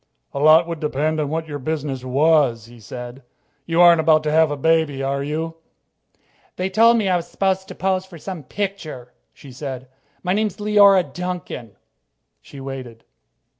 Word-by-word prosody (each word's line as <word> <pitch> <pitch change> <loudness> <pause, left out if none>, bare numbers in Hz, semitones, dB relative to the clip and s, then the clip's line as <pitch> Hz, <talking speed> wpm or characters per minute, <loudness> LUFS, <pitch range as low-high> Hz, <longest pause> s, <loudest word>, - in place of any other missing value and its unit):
"A - - -3
lot 155 +3 +6
would 165 -2 -5
depend 155 +1 -1
on 150 -2 -1
what 160 +1 -3
your 145 -1 -5
business 145 -2 -3
was," 135 -3 +2
he 120 0 -15
said. 125 +4 -9 0.5
"You 165 +1 +2
aren't 170 -1 +7
about 155 -1 +4
to 150 - -1
have 160 0 +4
a 145 - -3
baby, 155 -2 +1
are 140 +1 -1
you?" 160 +3 -4 1.0
"They 185 +1 -3
told 230 +1 +5
me 215 -3 0
I 185 - +2
was 170 0 -6
supposed 190 -1 -1
to - - -9
pose 190 -1 0
for 190 -2 -13
some 180 +1 -7
picture," 155 -8 -6 0.2
she 140 - -14
said. 130 -1 -7 0.4
"My 180 0 0
name's 210 -1 -1
Leora 205 -3 +5
Duncan." 175 - -6 0.7
She 140 - -13
waited. 130 -4 -8
155 Hz, 170 wpm, -21 LUFS, 135-180 Hz, 1.0 s, aren't